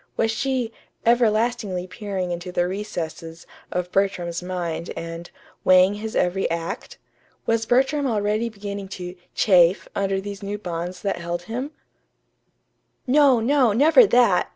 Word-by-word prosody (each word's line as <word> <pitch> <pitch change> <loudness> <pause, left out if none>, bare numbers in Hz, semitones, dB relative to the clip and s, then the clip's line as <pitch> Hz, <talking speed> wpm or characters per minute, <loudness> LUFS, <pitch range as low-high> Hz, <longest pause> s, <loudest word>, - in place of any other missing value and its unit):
Was 225 0 +2
she 250 -1 -1 0.3
"everlastingly 225 -5 +2
peering 185 -1 -4
into 175 +1 -5
the 175 0 +1
recesses" 170 -4 -5 0.3
of 180 0 -3
Bertram's 180 -3 0
mind 175 -2 -4
and 165 +1 -6 0.3
"weighing 185 +1 +6
his 215 +1 -6
every 180 +2 +1
act"? 170 +2 -4 0.5
Was 225 -1 0
Bertram 270 +3 +2
already 215 0 0
beginning 200 -2 -6
to 180 -1 -6 0.2
"chafe" 180 -2 +4
under 195 -1 0
these 200 0 -7
new 205 +1 -4
bonds 175 -2 -5
that 200 -1 -1
held 170 0 -4
him? 245 +9 -4 1.4
No, 270 -2 +5
no, 250 -1 +3
never 320 - +6
that! 240 - +3
200 Hz, 130 wpm, -23 LUFS, 180-230 Hz, 1.4 s, weighing